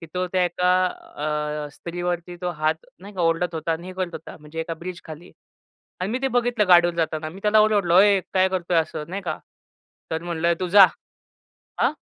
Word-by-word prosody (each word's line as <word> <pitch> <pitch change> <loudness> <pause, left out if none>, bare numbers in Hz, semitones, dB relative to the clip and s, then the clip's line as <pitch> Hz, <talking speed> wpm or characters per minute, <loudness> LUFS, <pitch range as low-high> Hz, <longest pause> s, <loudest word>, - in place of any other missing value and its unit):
की 165 - -9
तो 180 0 -1
त्या 185 -1 +3
एका 180 +1 +1 0.9
अ, - - -9
स्त्रीवरती 175 0 -4
तो 180 - -1
हात 155 0 -1
नाही 200 +2 -12
का, 185 - -4
ओरडत 165 +1 +1
होता 165 +1 -1
आणि 170 +2 -5
हे 185 - -7
करत 185 -1 -2
होता. - - -9
म्हणजे 150 +2 -7
एका 165 0 -4
ब्रिजखाली. 170 -1 -9 0.7
आणि 185 +3 -2
मी 250 - -1
ते 270 - +2
बघितलं 240 -4 +1
गाडीवरून 175 -1 +6
जाताना. 155 -1 -1
मी 190 +5 -11
त्याला 215 0 +4
ओरडलो, 205 -5 +3
"ओय 200 0 +6
काय 190 0 +4
करतोय?" 180 -2 -1
असं 155 -1 -2
नाही 195 +2 -5
का? 175 - -3 0.7
तर 160 +1 -2
म्हटलं 170 0 0
"तू 185 - -1
जा." 195 +2 +9 1.0
हां. - - +2
175 Hz, 195 wpm, -23 LUFS, 165-190 Hz, 1.0 s, जा